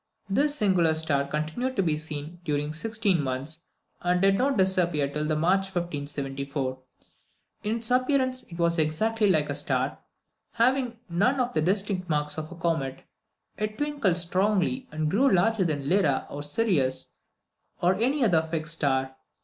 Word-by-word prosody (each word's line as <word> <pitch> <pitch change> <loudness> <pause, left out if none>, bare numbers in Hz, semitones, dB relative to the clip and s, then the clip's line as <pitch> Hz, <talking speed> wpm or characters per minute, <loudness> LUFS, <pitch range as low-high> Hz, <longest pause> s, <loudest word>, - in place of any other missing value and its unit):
This 285 +9 +2
singular 185 - +3
body 140 -3 0
continued 160 - -2
to 195 - +2
be 160 -3 +1
seen 155 +2 -6
during 150 -2 -1
16 210 -1 0
months, 135 +4 -3 0.4
and 180 0 +1
did 195 +1 +4
not 270 +5 +1
disappear 180 -6 +2
till 150 +2 -3
March 185 +5 +2
1574. 140 -4 -3 0.8
In 215 +2 0
its 230 0 -2
appearance 255 0 +2
it 170 - -9
was 170 -1 +2
exactly 210 +8 +1
like 155 -5 +2
a 145 - -2
star, 140 -1 -1 0.5
having 245 0 +2
none 210 +10 +1
of 250 0 0
the - - +1
distinctive 190 +1 0
marks 150 0 -1
of 155 +1 -7
a - - -8
comet. 160 -6 -2 0.6
It 215 0 -2
twinkled 285 - +1
strongly, 200 +8 +1
and 155 0 -1
grew 240 - +3
larger 195 +2 +3
than 145 -4 -2
Lyra 165 -7 +2
or 145 - -5
Sirius, 145 - 0 0.7
or 175 +2 +3
any 255 +8 +1
other 170 -7 +4
fixed 160 0 -1
star. 135 -4 0
175 Hz, 155 wpm, -27 LUFS, 150-215 Hz, 0.8 s, did